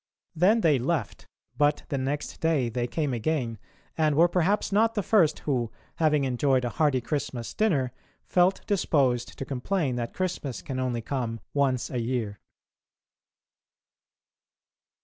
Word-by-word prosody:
Then 200 +8 +4
they 150 -7 +4
left, 135 -3 -2 0.3
but 145 0 +3
the 140 - -1
next 140 +3 -3
day 155 -7 +2
they 120 +1 -2
came 145 0 -1
again, 120 -2 -1 0.4
and 155 -2 +2
were 170 +3 +6
perhaps 185 +5 +1
not 225 +3 +3
the 205 - 0
first 185 -8 +3
who, 125 -6 0 0.3
having 150 -3 +3
enjoyed 130 0 +1
a - - 0
hearty 140 0 +1
Christmas 125 -4 -3
dinner, 145 - +1 0.3
felt 180 +1 +2
disposed 130 - +1
to 135 - -4
complain 135 0 -1
that 120 -1 -4
Christmas 180 -8 -3
can 130 -2 -4
only 125 -3 -1
come 115 -3 -3
once 135 -3 +1
a 125 - -1
year. 115 -4 -2
140 Hz, 140 wpm, -27 LUFS, 125-165 Hz, 0.4 s, were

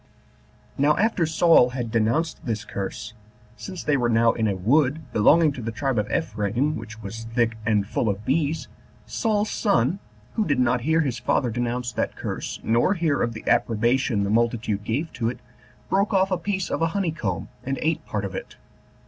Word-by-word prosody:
Now 150 +2 +4
after 205 -6 +2
Saul 160 -5 +5
had 125 -3 -4
denounced 120 +9 0
this 110 -3 -3
curse, 100 +2 -5 0.4
since 185 +5 -7
they 150 - +2
were 120 -2 +1
now 115 0 +4
in 110 -1 0
a 100 - 0
wood 135 - +2
belonging 150 +9 +5
to 130 - -7
the 115 0 -3
tribe 135 0 -1
of 105 +1 -2
Ephraim, 115 +9 0
which 110 0 -9
was 110 +3 -6
thick 115 -2 +2
and 105 -3 +2
full 110 +2 -1
of 100 +1 -3
bees, 145 0 0 0.4
Saul's 215 -1 0
son, 195 - +1 0.3
who 220 - +1
did 145 -8 0
not 125 0 +2
hear 160 +5 +2
his 130 -5 -2
father 120 - +1
denounce 120 +1 -2
that - - -2
curse, - - -5
nor 120 - +2
hear 160 -5 +1
of 115 - 0
the 110 - -10
approbation 115 -1 +2
the 100 - -1
multitude 115 -2 0
gave 140 +10 -2
to 115 - -1
it, 125 - -5 0.5
broke 200 +2 +1
off 190 0 +3
a 185 - +2
piece 190 0 -2
of - - -1
a 165 - +3
honey 190 -5 +1
comb, 95 - -3
and 135 +1 -2
ate 160 0 0
part 105 -1 -2
of 95 - -5
it. - - -7
125 Hz, 190 wpm, -24 LUFS, 110-160 Hz, 0.5 s, Saul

